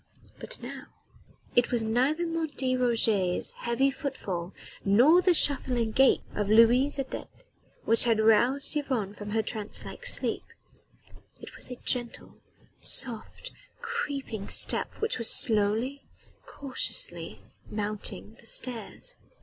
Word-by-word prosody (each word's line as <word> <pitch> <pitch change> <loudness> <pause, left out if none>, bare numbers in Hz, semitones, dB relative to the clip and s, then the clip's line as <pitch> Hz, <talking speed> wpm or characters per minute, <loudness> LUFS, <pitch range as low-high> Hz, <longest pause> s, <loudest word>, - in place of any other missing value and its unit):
But - - -8
now - - -8 0.7
it 245 - +3
was 240 -2 -1
neither 260 +9 0
Martin 300 -6 -2
Roget's 220 -7 +1
heavy 265 +3 0
footfall 195 - -5 0.3
nor 250 - +5
the 360 -1 +3
shuffling 250 -6 +2
gait 265 +4 +4
of 205 -1 -2
Louise 240 +6 +4
Adet 270 -1 -5 0.6
which 230 +2 +4
had 230 -2 +2
roused 240 +7 +3
Yvonne 255 -9 -2
from 205 0 -9
her 220 +1 0
trance 215 -1 -6
like - - -8
sleep. - - -1 1.0
It - - -12
was - - -4
a 250 - -6
gentle, 240 -1 -2 0.5
soft, 235 -5 0 0.3
creeping 285 - -5
step - - +1
which 440 - -1
was 230 - +4
slowly, 225 +3 +4 0.5
cautiously 285 - 0 0.3
mounting 210 +1 -5
the 230 - -8
stairs. 250 - -2
240 Hz, 120 wpm, -27 LUFS, 220-275 Hz, 1.0 s, nor